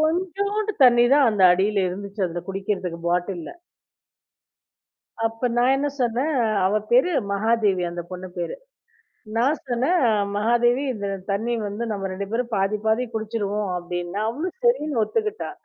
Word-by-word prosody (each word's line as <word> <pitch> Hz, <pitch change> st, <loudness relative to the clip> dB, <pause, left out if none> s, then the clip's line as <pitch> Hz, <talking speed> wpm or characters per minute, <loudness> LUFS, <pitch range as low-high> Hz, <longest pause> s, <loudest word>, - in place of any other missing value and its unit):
கொஞ்சூண்டு 395 Hz, +6 st, 0 dB
தண்ணிதான் 245 Hz, +2 st, +6 dB
அந்த 205 Hz, -3 st, +3 dB
அடியில 195 Hz, +1 st, +1 dB
இருந்துச்சு 200 Hz, +2 st, -6 dB
அதுல 175 Hz, 0 st, -5 dB
குடிக்கிறதுக்கு 190 Hz, -3 st, -3 dB
பாட்டில்ல. 175 Hz, -1 st, -2 dB, 1.8 s
அப்ப 225 Hz, +2 st, -2 dB
நான் 250 Hz, +2 st, +4 dB
என்ன 290 Hz, +1 st, 0 dB
சொன்னேன், 250 Hz, +6 st, 0 dB, 0.3 s
அவ 200 Hz, -, +1 dB, 0.2 s
பேரு 255 Hz, +9 st, +5 dB, 0.2 s
மகாதேவி 210 Hz, -2 st, +1 dB
அந்த 175 Hz, 0 st, -5 dB
பொண்ணு 185 Hz, 0 st, -7 dB
பேரு. 175 Hz, -1 st, -3 dB, 0.8 s
நான் 270 Hz, +6 st, +2 dB
சொன்னேன் 265 Hz, +9 st, +1 dB, 0.4 s
"மகாதேவி 240 Hz, +4 st, +2 dB
இந்த 200 Hz, -2 st, -4 dB, 0.2 s
தண்ணி 220 Hz, +5 st, -1 dB, 0.2 s
வந்து 210 Hz, +4 st, -4 dB
நம்ம 195 Hz, -1 st, -3 dB
2 200 Hz, +1 st, -4 dB
பேரும் 240 Hz, +2 st, -2 dB
பாதி 195 Hz, +2 st, +1 dB
பாதி 220 Hz, +3 st, +2 dB
குடிச்சிருவோம்" 210 Hz, -2 st, -2 dB
அப்படின்னு. 175 Hz, +1 st, -5 dB
அவளும் 320 Hz, -, -4 dB
சரின்னு 305 Hz, -, +2 dB
ஒத்துக்கிட்டா. 430 Hz, -, -2 dB
225 Hz, 130 wpm, -23 LUFS, 195-260 Hz, 1.8 s, தண்ணிதான்